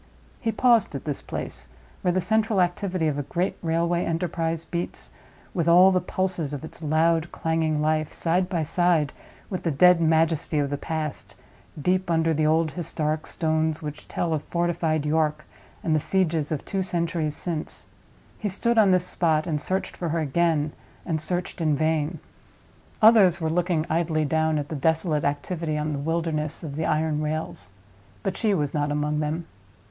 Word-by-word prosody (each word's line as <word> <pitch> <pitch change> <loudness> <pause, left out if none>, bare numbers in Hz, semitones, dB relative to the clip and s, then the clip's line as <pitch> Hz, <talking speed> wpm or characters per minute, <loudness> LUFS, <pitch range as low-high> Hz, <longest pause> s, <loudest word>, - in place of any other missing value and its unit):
He 225 - 0
paused 230 - +3
at 140 - -6
this 145 -3 -2
place—where 180 - -5
the 185 - +1
central 220 0 +2
activity 180 -1 0
of 145 -1 -1
a 145 - -6
great 180 +2 0
railway 170 +1 +1
enterprise 165 -1 -2
beats, 170 0 -4 0.4
with 170 -2 -1
all 180 +3 +7
the 185 -1 +2
pulses 180 -6 -2
of 145 - -7
its 160 - -9
loud 160 +2 +2
clanging 160 -2 0
life, 155 0 +1
side 180 +2 0
by 170 -5 0
side 165 -2 +2 0.4
with 185 - -2
the 170 - -1
dead 175 +4 +5
majesty 160 -1 +2
of 145 -1 0
the - - 0
past, 155 -2 -4 0.4
deep 185 +4 +1
under 165 -1 +2
the 155 0 +2
old 160 0 +2
historic 155 -3 -2
stones 160 -1 0
which 150 0 -7
tell 165 -2 -1
of 155 - -1
fortified 165 -2 -1
York 155 0 0 0.4
and 160 - +1
the 155 - +3
sieges 165 -3 0
of 150 - -3
two 195 - -2
centuries 170 -4 -1
since—he 175 +5 -6
stood 230 +4 +2
on 205 -3 +6
this 185 -1 +4
spot, 160 -4 +1
and 155 -4 -1
searched 190 +3 -1
for 170 - -3
her 165 +1 0
again, 155 0 +1 0.3
and 160 -3 -1
searched 175 +1 -3
in 155 -2 +2
vain. 155 +1 0 0.9
Others 215 -6 +7
were 160 -1 -1
looking 170 -2 +1
idly 160 -1 +1
down 160 +1 +1
at 145 0 -3
the 160 - -4
desolate 160 +1 +1
activity 155 +2 -2
on 150 0 -1
the 140 - -3
wilderness 160 0 -2
of 145 -3 -5
the 160 +1 -1
iron 155 0 +1
rails; 155 - -3 0.5
but 190 -1 -1
she 210 -1 +1
was 145 -5 -1
not 145 -1 0
among 150 +1 0
them. 155 +2 -2
160 Hz, 175 wpm, -25 LUFS, 155-175 Hz, 0.9 s, all